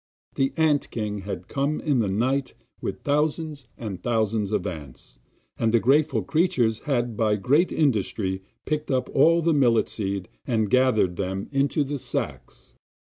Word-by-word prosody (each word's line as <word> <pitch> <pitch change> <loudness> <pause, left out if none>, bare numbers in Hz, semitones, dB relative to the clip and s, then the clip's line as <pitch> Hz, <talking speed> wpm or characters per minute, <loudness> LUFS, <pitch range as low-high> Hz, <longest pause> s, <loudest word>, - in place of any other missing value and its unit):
The 135 0 +1
ant 155 -3 +2
king 105 -2 -3
had 100 +1 -6
come 140 +2 -1
in 145 -5 +1
the 110 - +1
night 130 +7 0 0.3
with - - -4
thousands 150 -1 -1
and 100 -6 -6
thousands 110 -2 0
of 105 - 0
ants, 70 -9 -8 0.4
and 115 -1 +2
the 115 - +4
grateful 135 -3 +2
creatures 120 - +1
had 120 -5 -1
by 105 -1 +2
great 145 - +2
industry 105 -8 0 0.2
picked 150 0 -2
up 130 -1 0
all 165 +4 +5
the 165 0 +3
millet 120 -6 +3
seed 100 -3 -3 0.2
and 110 -5 0
gathered 120 -9 +3
them 95 0 -3
into 140 +2 +1
the 140 0 -4
sacks. - - -5
120 Hz, 155 wpm, -25 LUFS, 105-145 Hz, 0.4 s, all